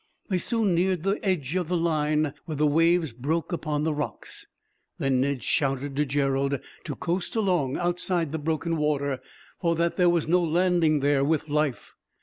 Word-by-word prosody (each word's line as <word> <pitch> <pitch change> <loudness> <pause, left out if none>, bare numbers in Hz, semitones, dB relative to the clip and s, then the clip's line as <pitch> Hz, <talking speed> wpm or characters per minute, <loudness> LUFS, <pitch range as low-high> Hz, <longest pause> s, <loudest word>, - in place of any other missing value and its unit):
They 185 -3 +1
soon 220 -2 +1
neared 180 -1 +1
the 195 +2 0
edge 175 -6 -1
of 180 -3 0
the 180 +1 0
line 155 -3 +1
where 155 - -4
the 150 +1 +2
waves 165 -1 +3
broke 150 +8 -2
upon 150 -3 -1
the 155 0 +1
rocks. 145 -1 -5 0.5
Then 135 -2 +1
Ned 135 -3 -1
shouted 135 +1 0
to 150 +1 +1
Gerald 140 0 0 0.3
to - - -4
coast 175 +3 -2
along, 180 - +1
outside 175 -2 0
the 160 - -2
broken 160 +2 -1
water; 140 -3 0 0.4
for 170 -2 +1
that 170 +1 0
there 180 -2 +5
was 170 -3 +1
no 180 +2 +3
landing 170 -2 +2
there, 140 -1 +3
with 155 +1 0
life. 150 -3 -1
155 Hz, 175 wpm, -26 LUFS, 145-175 Hz, 0.5 s, there